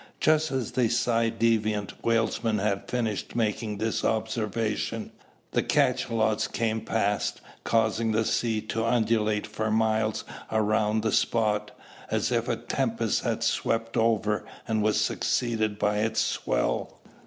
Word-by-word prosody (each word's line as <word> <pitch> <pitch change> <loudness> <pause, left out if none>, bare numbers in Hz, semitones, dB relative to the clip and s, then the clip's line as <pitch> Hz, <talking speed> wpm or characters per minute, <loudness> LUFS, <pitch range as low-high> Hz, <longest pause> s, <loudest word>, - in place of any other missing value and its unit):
Just 155 0 +3
as 130 -4 -2
the 125 -3 +2
ci 115 0 +2
devant 110 -3 0
whalesman 115 -1 +1
had 100 -1 -1
finished 115 -5 -2
making 110 -2 -1
this 110 +1 -1
observation, 110 -1 -1 0.4
the - - +2
cachalots 110 -2 +1
came 110 -1 -1
past, 105 -2 0 0.2
causing 115 0 +1
the 110 +1 +1
sea 110 -2 0
to 110 +1 -2
undulate 110 -2 +1
for 110 0 -3
miles 110 0 +1 0.3
around 110 0 +1
the 110 - +1
spot, 105 -2 +1 0.4
as - - 0
if - - +1
a - - +1
tempest - - -1
had - - -1
swept 115 0 0
over, 110 -2 +2 0.2
and 110 -1 +1
was 105 0 +2
succeeded 110 -4 0
by 105 0 +1
its 110 0 0
swell. - - -1
110 Hz, 130 wpm, -27 LUFS, 105-115 Hz, 0.4 s, Just